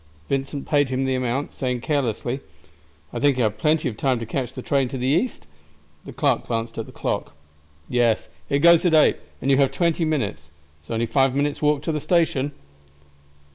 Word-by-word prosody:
Vincent 135 +1 -2
paid 145 -3 +2
him 130 +1 -1
the 130 - 0
amount, 130 +2 -1
saying 125 -2 -2
carelessly, 130 -2 -1 0.7
"I - - -3
think 140 -2 +3
I - - +1
have 110 -2 0
plenty 155 +5 +2
of 110 - -4
time 130 0 +1
to 115 - -5
catch 125 +1 -3
the 130 - -8
train 135 -3 +1
for 135 - -5
the 125 - -3
east?" 170 - 0 0.6
The - - -8
clerk - - 0
glanced 115 -1 -3
at 115 - -4
the - - -11
clock. - - -3 0.5
"Yes, 120 -3 +1 0.2
it 140 +1 +1
goes 170 -1 +7
at 175 -3 +3
8, 155 - +5 0.3
and 135 - +2
you 135 - +5
have 140 -1 +4
twenty 170 -1 +1
minutes. 110 - -2 0.3
It's 75 - -27
only 115 +1 0
five 135 +1 +2
minutes' 145 +1 0
walk 150 -1 +2
to 165 - -1
the 150 -1 -2
station." 155 -4 +1
135 Hz, 200 wpm, -23 LUFS, 120-145 Hz, 0.7 s, goes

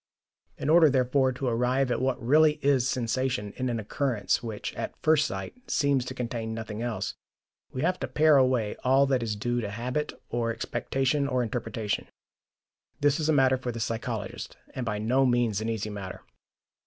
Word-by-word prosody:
In - - -4
order, 160 0 +7
therefore, 130 0 +2
to 130 +2 -5
arrive 125 +2 +1
at 120 - 0
what 130 0 0
really 150 +5 +5
is 135 -2 +3
sensation 120 -4 -1
in 130 -1 -2
an 115 -2 -1
occurrence 110 -1 0
which, 110 -3 -5
at - - -5
first 155 -1 +4
sight, - - -5 0.2
seems 140 - +2
to 130 - -6
contain 115 -2 -3
nothing 110 -1 -5
else, 120 -2 -2 0.6
we 130 - -3
have 180 +2 +1
to - - -3
pare 155 -1 +4
away 130 -5 +2
all 135 +2 +5
that 135 -2 +1
is 110 -2 -2
due 120 +3 -1
to 105 - -3
habit 125 +8 -2 0.2
or 115 -1 -1
expectation 135 +4 -1
or 130 -2 +1
interpretation. 115 -3 -3 0.9
This 145 +1 +2
is 155 0 0
a - - +4
matter 130 -2 +4
for 125 -1 -4
the 115 - -6
psychologist, 110 -2 -4 0.2
and 125 -2 -4
by 105 -2 -1
no 120 +6 +2
means 120 -5 +2
an 110 - -2
easy 110 -1 -3
matter. 100 -2 -7
125 Hz, 180 wpm, -27 LUFS, 115-135 Hz, 0.9 s, order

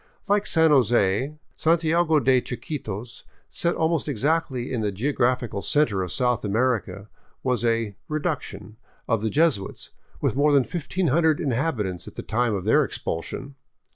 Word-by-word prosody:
Like 205 0 +2
San 160 -1 +4
Jose, 120 0 +2 0.2
Santiago 160 0 +2
de 130 -1 +3
Chiquitos, 120 -4 -6 0.3
set 170 0 0
almost 160 -1 0
exactly 135 -1 -1
in 120 - -1
the 105 -1 0
geographical 120 -1 0
center 130 -10 +2
of 90 -1 -3
South 125 -1 +1
America, 110 -1 -1 0.4
was 125 -4 0
a 115 -3 0
" - - -48
reduction 110 - -4 0.2
" - - -37
of 115 -3 +1
the 110 - 0
Jesuits, 140 -8 0 0.3
with - - 0
more 145 +1 +3
than 140 -2 +5
1500 160 -1 +1
inhabitants 115 - -1
at - - -10
the - - -6
time 120 -1 0
of 95 - -4
their - - +4
expulsion. 85 +11 -5
125 Hz, 150 wpm, -24 LUFS, 110-155 Hz, 0.4 s, than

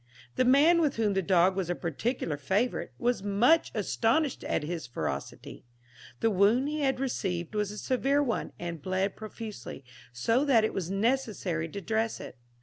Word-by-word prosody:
The 255 - +2
man, 300 +7 +5
with 295 -4 +1
whom 215 -3 +1
the 195 - +1
dog 185 +1 +3
was 190 -3 -2
a 175 - 0
particular 170 - -2
favourite, 190 - -1
was 245 -3 0
much 225 +11 +3
astonished 230 +7 0
at - - -1
his 165 -2 -4
ferocity. 75 - -5 0.6
The 225 - +3
wound 210 +8 +3
he 305 +1 -3
had 270 -3 +1
received 190 -9 -2
was 210 -1 0
a 210 - -7
severe 275 +4 +1
one, 235 -6 -2
and 170 -3 -5
bled 185 +4 -1
profusely, 215 - -8 0.3
so 225 - +1
that 255 -7 +4
it 220 - 0
was 180 -3 -3
necessary 195 -6 -1
to 200 - -6
dress 220 +3 -1
it. - - -9
210 Hz, 170 wpm, -29 LUFS, 180-250 Hz, 0.6 s, man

